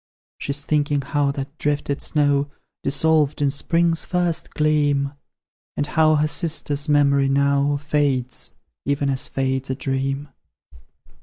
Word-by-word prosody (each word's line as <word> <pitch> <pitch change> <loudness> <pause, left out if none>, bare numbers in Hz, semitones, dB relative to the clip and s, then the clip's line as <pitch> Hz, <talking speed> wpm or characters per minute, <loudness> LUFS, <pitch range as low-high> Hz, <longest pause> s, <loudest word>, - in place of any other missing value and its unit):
She's 140 0 -2
thinking 145 -1 +1
how 145 +1 0
that 140 +1 -6
drifted 145 -1 -1
snow 145 -2 +1 0.3
Dissolved 150 +1 +2
in 140 -1 +2
spring's 165 +3 +1
first 175 -2 -1
gleam, 145 -2 +2 0.6
And 145 - +1
how 155 0 +3
her 150 0 +2
sister's 150 -2 -1
memory 140 -2 +3
now 140 +1 +2
Fades, 140 -3 -1 0.3
even 140 0 0
as 130 - -2
fades 130 0 -2
a 130 - -1
dream. 135 +2 -2
145 Hz, 125 wpm, -22 LUFS, 140-150 Hz, 0.6 s, how